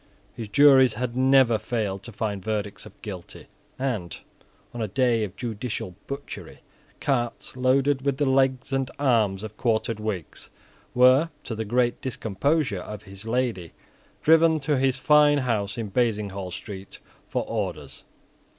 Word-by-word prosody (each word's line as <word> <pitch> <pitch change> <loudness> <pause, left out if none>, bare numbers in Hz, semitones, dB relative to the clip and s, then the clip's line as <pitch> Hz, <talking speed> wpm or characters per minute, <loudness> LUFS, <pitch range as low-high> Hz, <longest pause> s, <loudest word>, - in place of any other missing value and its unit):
His 115 - -6
juries 135 -1 +6
had 120 +1 -3
never 130 -3 +4
failed 105 -5 -2
to 120 - -10
find 105 -2 -3
verdicts 105 -2 -3
of - - -18
Guilty; 95 -5 -8 0.3
and, 115 - -3 0.5
on 120 - -5
a 110 - -1
day 120 +1 +2
of 100 -3 -5
judicial 115 -4 -4
butchery, 140 +1 -7 0.4
carts, 120 -3 -2
loaded 135 +2 +2
with 140 -1 0
the 145 - +1
legs 130 0 +1
and 135 -1 0
arms 110 -8 +2
of 110 -1 -8
quartered 115 -2 0
Whigs, 105 -7 -5 0.5
were, 130 +6 +6
to - - -4
the 110 0 -3
great 120 +2 +1
discomposure 125 - -1
of 105 +1 -8
his 100 +1 -10
lady, 115 -8 -1 0.5
driven 160 0 +5
to 145 +1 +1
his 130 -1 +2
fine 150 +1 +5
house 115 -6 -1
in 110 -3 -4
Basinghall 100 -5 -1
Street 95 +1 -8 0.3
for - - -1
orders. 85 -11 -4
120 Hz, 145 wpm, -25 LUFS, 105-130 Hz, 0.5 s, juries